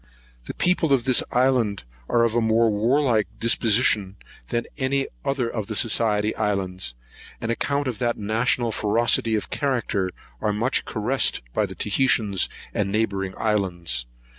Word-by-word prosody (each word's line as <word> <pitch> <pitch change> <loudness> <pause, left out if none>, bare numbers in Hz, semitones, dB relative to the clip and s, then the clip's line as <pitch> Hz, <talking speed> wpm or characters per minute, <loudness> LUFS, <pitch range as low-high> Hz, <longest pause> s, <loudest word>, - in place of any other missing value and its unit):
The - - -7
people 180 -4 +1
of 130 -3 +2
this 130 -1 +4
island 125 - +1 0.3
are 120 - +3
of 115 -2 +1
a 120 - +2
more 110 0 +3
warlike 115 +1 +2
disposition 110 -4 +3 0.3
than 120 - -2
any 135 -1 0 0.2
other 135 -3 -1
of 110 -3 -4
the 110 - -4
Society 105 -1 +2
Islands; 95 - -2 0.4
and 115 - -4
on - - +2
account 140 +3 -1
of 120 -3 -4
that 120 -2 0
national 115 +3 0
ferocity 110 +1 +2
of 105 - -3
character, 120 -9 -1 0.3
are 105 - 0
much 115 +5 0
caressed 115 - 0
by - - +1
the - - -9
Otaheitans 105 -4 +1 0.2
and 100 -1 -1
neighbouring 100 -3 -1
islands. 90 - -1
115 Hz, 150 wpm, -23 LUFS, 105-125 Hz, 0.4 s, this